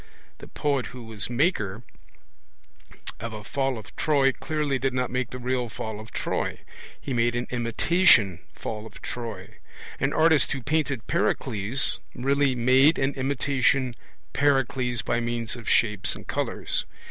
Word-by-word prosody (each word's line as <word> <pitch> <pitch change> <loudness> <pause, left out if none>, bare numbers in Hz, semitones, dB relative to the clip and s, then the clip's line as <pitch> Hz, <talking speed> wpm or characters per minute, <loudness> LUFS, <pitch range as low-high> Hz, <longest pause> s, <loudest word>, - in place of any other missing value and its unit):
The - - -10
poet 140 -4 -1
who 125 -1 -9
was 110 -2 -4
'maker' 120 - 0 1.4
of 115 0 -5
a 105 -1 -7
Fall 135 +3 -1
of 110 - -11
Troy 140 -3 +3
clearly 150 -1 -2
did 130 0 0
not 125 -1 -1
make 125 -1 -1
the 125 - -6
real 125 -1 -1
Fall 110 0 -5
of 110 +1 -10
Troy. - - -2 0.4
He 135 - -4
made 120 0 +2
an 120 +1 -1
imitation 115 - +4
Fall 110 0 -5
of - - -13
Troy. 110 -6 -6 0.4
An 135 +1 +1
artist 160 -3 +4
who 135 -3 -5
'painted 140 -6 0
Pericles' 110 +6 0 0.2
really 135 +1 +2
'made 130 +6 +5
an 135 +1 +1
imitation 135 -1 +1 0.4
Pericles 135 -4 +1
by 120 - 0
means 120 -1 -2
of 120 -2 -6
shapes 105 -4 +2
and - - -11
colours'. - - -1
125 Hz, 145 wpm, -26 LUFS, 115-135 Hz, 1.4 s, made